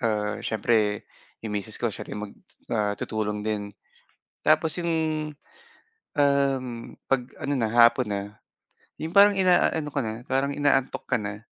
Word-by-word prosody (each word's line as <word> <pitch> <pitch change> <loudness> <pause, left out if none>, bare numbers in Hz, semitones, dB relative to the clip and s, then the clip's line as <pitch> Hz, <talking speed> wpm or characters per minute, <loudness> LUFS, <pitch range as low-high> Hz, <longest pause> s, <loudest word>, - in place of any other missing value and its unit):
ah, 105 -2 -1
siyempre 110 -1 +1 0.4
'yung 110 - -3
misis 105 +1 -2
ko 120 -3 -1
siya - - -7
rin - - -5
mag 100 - -10 0.4
ah, 105 -2 0
tutulong 105 -1 -3
din. 105 -1 -2 0.8
Tapos 160 - +4
'yung, 170 -1 -1 1.3
um, 140 -2 +3 0.4
pag 135 -2 +2 0.2
ano 145 - 0
na 115 -5 0
hapon 120 +1 +5
na, 100 -1 -1 0.8
'yung 160 +3 -5
parang 205 +1 +8
ina-ano 175 -4 +3
ka 145 - -1
na, 110 0 -3
parang 135 +2 +1
inaantok 140 -2 +1
ka 125 - +2
na, 105 -2 -5
120 Hz, 145 wpm, -26 LUFS, 105-140 Hz, 1.3 s, parang